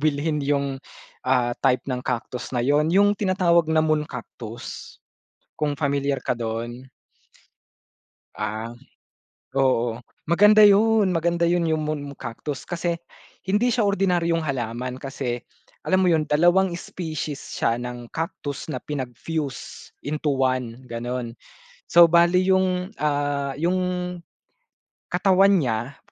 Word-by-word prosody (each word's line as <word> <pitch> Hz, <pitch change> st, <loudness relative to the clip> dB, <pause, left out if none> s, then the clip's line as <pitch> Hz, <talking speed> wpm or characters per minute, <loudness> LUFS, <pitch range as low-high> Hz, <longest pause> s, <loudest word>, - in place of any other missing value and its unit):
bilhin 150 Hz, 0 st, 0 dB
yung, 140 Hz, -1 st, -1 dB, 0.4 s
ah, 125 Hz, -2 st, +1 dB
type 130 Hz, -2 st, +2 dB
ng 125 Hz, -2 st, -3 dB
Cactus 125 Hz, 0 st, -4 dB
na 125 Hz, -, -2 dB
yun. 150 Hz, +3 st, +3 dB
Yung 205 Hz, +3 st, +4 dB
tinatawag 180 Hz, -5 st, +2 dB
na 160 Hz, -, +3 dB
Moon 155 Hz, -1 st, +2 dB
Cactus 120 Hz, -2 st, -8 dB, 0.6 s
kung 145 Hz, -2 st, -1 dB
pamilyar 140 Hz, -2 st, -1 dB
ka -, -, +2 dB
'don. 120 Hz, +2 st, -5 dB, 1.5 s
Ah, 110 Hz, +3 st, -4 dB, 0.8 s
oo, 120 Hz, -4 st, +2 dB, 0.3 s
maganda 210 Hz, +5 st, +6 dB
'yun 210 Hz, 0 st, +5 dB
maganda 170 Hz, 0 st, +1 dB
'yun, 175 Hz, -1 st, +2 dB
yung 160 Hz, -1 st, 0 dB
Moon 145 Hz, -2 st, -4 dB
Cactus, 135 Hz, +2 st, -6 dB
kasi 170 Hz, -1 st, -2 dB, 0.5 s
hindi 220 Hz, +5 st, +2 dB
siya 225 Hz, -5 st, +2 dB
ordinaryong 175 Hz, -4 st, +1 dB
halaman 125 Hz, -1 st, -3 dB
kasi 130 Hz, -3 st, -4 dB, 0.4 s
alam 185 Hz, 0 st, +2 dB
mo -, -, +3 dB
'yun 155 Hz, -2 st, +2 dB
dalawang 175 Hz, +5 st, +4 dB
species 155 Hz, -5 st, -5 dB
siya 115 Hz, +1 st, -1 dB
ng 125 Hz, -1 st, -7 dB
Cactus 150 Hz, -3 st, -4 dB
na -, -, -2 dB
pinag-fuse 140 Hz, +1 st, -5 dB
into 150 Hz, +1 st, -1 dB
one 130 Hz, -2 st, -1 dB
ganun. 120 Hz, 0 st, -4 dB, 0.6 s
So, 170 Hz, 0 st, +8 dB
bale 170 Hz, +2 st, +5 dB
yung 185 Hz, 0 st, +1 dB
ah, 145 Hz, -2 st, 0 dB
yung 175 Hz, +4 st, +1 dB, 1.3 s
katawan 195 Hz, +2 st, +4 dB
niya 120 Hz, +1 st, -2 dB
145 Hz, 120 wpm, -24 LUFS, 125-175 Hz, 1.5 s, So